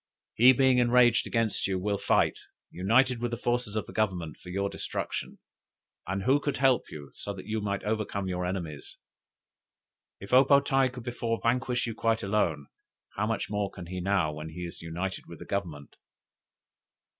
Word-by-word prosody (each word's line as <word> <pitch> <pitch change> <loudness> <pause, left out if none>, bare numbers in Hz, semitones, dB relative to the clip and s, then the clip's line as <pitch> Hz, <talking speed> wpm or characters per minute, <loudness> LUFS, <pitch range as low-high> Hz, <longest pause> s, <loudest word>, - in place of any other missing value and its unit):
He 125 +3 +7
being 130 -1 +4
enraged 120 0 +4
against 115 -4 0
you, 95 -1 -1
will 100 +2 -1
fight, 100 - +2 0.3
united 115 +7 +2
with 120 - 0
the 120 - -3
forces 120 -2 -1
of 110 - -1
the - - -11
Government, 90 -8 -1
for 90 - -12
your 100 +2 -1
destruction; - - -4 0.7
and 95 +1 -2
who 135 +6 +4
could 145 -1 -2
help 130 -1 +3
you, 70 -2 -9
so 100 - -5
that 95 - -9
you 110 +1 -2
might 100 -1 -2
overcome 105 -2 -2
your 90 -1 -2
enemies? 90 -5 -5 1.2
If 100 +4 -9
O 130 +1 +8
po 140 +1 +6
tae 135 -1 +2
could 125 -1 -9
before 115 -1 -2
vanquish 125 +1 +1
you 115 - -3
quite 115 0 0
alone, 90 -8 0 0.5
how 105 +2 0
much 115 -1 -1
more 105 -1 -1
can 90 - -9
he 90 +1 -5
now 90 -5 +1
when 75 +1 -7
he 90 +2 -6
is 85 - -9
united 85 +4 -4
with - - -10
Government? 85 -8 -4
105 Hz, 180 wpm, -28 LUFS, 90-120 Hz, 1.2 s, O